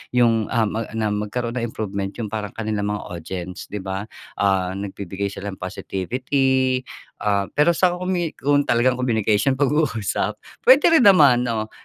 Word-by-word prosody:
'yung, 115 -3 +3
ah, 115 - +3
ma 115 0 -3
na 110 -1 0
magkaroon 115 +4 -3
ng 120 - -2
improvement 100 -2 -3
'yung 115 -3 -4
parang 105 -2 -4
kanilang 105 -2 -2
mga 105 - -6
audience, 90 +1 -6
'di 105 -1 -6
ba? 95 +1 -4 0.3
Ah, 95 -2 +1
nagbibigay 100 0 -4
sila 100 +1 -6
ng 95 - -10
positivity, 130 +8 -1 0.4
ah, 100 -2 +1
pero 150 +4 +4
sa 175 +1 +2
commu 180 -2 -2
kung 145 +1 +1
talagang 125 +2 +2
communication, 110 0 +1
pag-uusap, 130 -7 0 0.3
pwede 295 +5 +7
rin 245 - +3
naman. 140 -10 +6
Oh, 110 -2 -2
115 Hz, 155 wpm, -22 LUFS, 100-130 Hz, 0.4 s, pwede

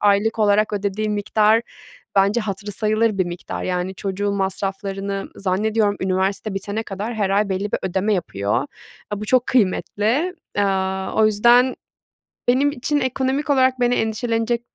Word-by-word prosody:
aylık 205 +2 +2
olarak 210 0 +3
ödediği 205 +1 -1
miktar, 210 +2 +2 0.5
bence, 200 +4 +4
hatırı 205 -1 -5
sayılır 215 +1 +1
bir 185 - +2
miktar. 175 0 -6
Yani, 180 +1 -2
çocuğun 200 +1 -2
masraflarını 195 0 -3
zannediyorum, 205 +2 +1
üniversite 190 +2 -1
bitene 205 +3 -3
kadar 210 +3 -5
her 205 -3 0
ay 200 +1 +2
belli 195 +2 -2
bir - - +1
ödeme 190 +3 0
yapıyor. 110 - -1 0.5
A, 205 -1 -3
bu - - -4
çok 255 +2 +3
kıymetli. 240 - +1 0.2
Aaa, 190 -1 0
o 220 - +4
yüzden 240 +4 +4 0.7
benim 270 +4 +3
için 290 +3 -1
ekonomik 265 +2 -1
olarak 260 -2 +3
beni 245 0 +3
endişelenecek 230 +1 0
205 Hz, 140 wpm, -21 LUFS, 195-230 Hz, 0.7 s, bence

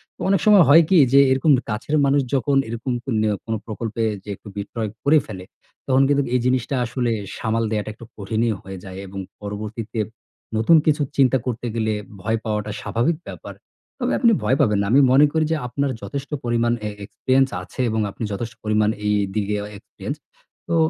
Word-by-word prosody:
তো - - -68
অনেক 195 -1 +3
সময় 210 -4 +7
হয় 165 +4 +8
কি? 190 - +5 0.2
যে, 140 - +8
এরকম 135 +4 +3 0.2
কাছের 115 +8 -2
মানুষ 140 +1 +3
যখন 140 +1 +1
এরকম 115 +3 -3
ক - - -67 0.2
নে 110 - +2 0.2
কোনো 115 -1 -2
প্রকল্পে 115 0 -4 0.2
যে, - - -11
একটু 105 - -16
বিট্রে 105 +2 -4
করে 150 +2 +5
ফেলে, 95 -4 -8 0.4
তখন 130 0 +4
কিন্তু 140 -1 +3
এই 125 - +3
জিনিসটা 130 +1 +1
আসলে 120 0 -1 0.3
সামাল 115 +1 0
দেয়াটা 105 -1 -2
একটু 115 - -13
কঠিনই 110 +3 0
হয়ে 95 0 -8
যায় 95 -1 -9
এবং 95 +1 -7 0.2
পরবর্তীতে 105 +2 -5 0.6
নতুন 115 +10 +5
কিছু 150 -1 +2 0.2
চিন্তা 130 -1 +4
করতে 120 -1 -3
গেলে, 110 -1 0 0.3
ভয় 110 +3 0
পাওয়াটা 105 -1 -2
স্বাভাবিক 130 +8 0
ব্যাপার। - - -8 0.5
তবে - - 0
আপনি 235 -3 +5
ভয় 130 - +2
পাবেন 105 -6 +3
না। 100 - 0
আমি 140 +3 +6
মনে 140 +3 +7
করি 160 0 +1
যে, - - +3
আপনার 140 +3 -1
যথেষ্ট 140 0 -5
পরিমাণ 120 0 +1
এ - - -2 0.2
এক্সপেরিয়েন্স 130 +5 +1
আছে 90 - -13
এবং 110 0 0
আপনি 115 - -7
যথেষ্ট 115 +4 -4
পরিমাণ 105 0 +2 0.2
এইদিকে 105 0 0 0.2
এক্সপেরিয়েন্স। - - -7 0.5
তো - - +1
115 Hz, 185 wpm, -22 LUFS, 105-135 Hz, 0.6 s, হয়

